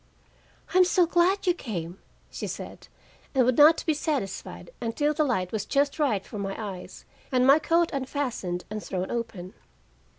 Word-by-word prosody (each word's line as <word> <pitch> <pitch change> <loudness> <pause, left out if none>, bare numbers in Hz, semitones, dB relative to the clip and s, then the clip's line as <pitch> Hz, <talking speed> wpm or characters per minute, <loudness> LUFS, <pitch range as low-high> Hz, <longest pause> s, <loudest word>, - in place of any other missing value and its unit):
"I'm 370 0 +7
so 360 0 +3
glad 350 +4 +2
you 355 - +4
came!" 185 - -6 0.3
she - - -5
said, - - -8 0.5
and 255 -2 +4
would 255 0 +2
not 310 +2 +7
be 315 - +2
satisfied 290 - -4
until 290 +6 0
the 305 - +1
light 190 -10 -1
was 215 -2 -2
just 280 +6 0
right 220 -10 +1
for 210 - -7
my 195 -1 -3
eyes, 195 -4 -7 0.3
and 255 -1 +3
my 275 +3 +7
coat 335 +2 +2
unfastened 255 -10 -3
and 215 -1 -4
thrown 185 -1 -3
open. 200 -6 -5
255 Hz, 165 wpm, -26 LUFS, 195-305 Hz, 0.5 s, I'm